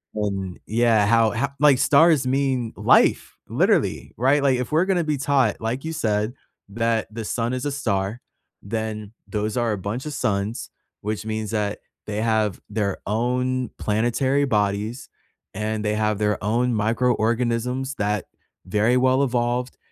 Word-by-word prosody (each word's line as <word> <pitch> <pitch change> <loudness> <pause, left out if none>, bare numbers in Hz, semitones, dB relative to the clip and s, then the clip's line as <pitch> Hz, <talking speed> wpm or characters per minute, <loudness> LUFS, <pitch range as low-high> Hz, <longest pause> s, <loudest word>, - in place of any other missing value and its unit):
And 95 -3 -3
yeah, 110 -1 +3
how 115 0 +4
ho 140 - 0
like, 145 -2 +6
stars 150 +1 +4
mean 130 -3 0
life, - - +3
literally, - - +1
right? 135 +5 +3
Like, 135 -3 +2
if 125 - -4
we're 160 +4 +3
gonna 185 -3 +1
be 155 -2 -1
taught- 135 -5 +1
like 115 +4 -2
you 160 - -3
said- 110 -6 0 0.4
that 115 +1 0
the 115 0 -5
sun 115 +2 -1
is 130 +1 -3
a 145 - -1
star, 110 -4 -2 0.4
then 110 0 -4
those 105 0 -2
are 120 -2 +1
a 105 - -1
bunch 105 +8 -4
a 150 - -4
suns, 105 -4 -2 0.3
which 105 +1 -3
means 110 0 -3
that 105 -1 -1 0.3
they 105 0 -3
have 110 -3 +1
their 100 -2 -1
own 125 +3 0
planetary 120 +6 +1
bodies, 105 +1 -1 0.4
and 110 +1 -2
they 105 0 0
have 105 -1 0
their 105 -1 0
own 120 +4 +1
microorganisms 120 +3 0
that 105 -2 -1 0.4
very-well 125 +7 +2
evolved 125 -1 -1
115 Hz, 150 wpm, -23 LUFS, 105-130 Hz, 0.4 s, like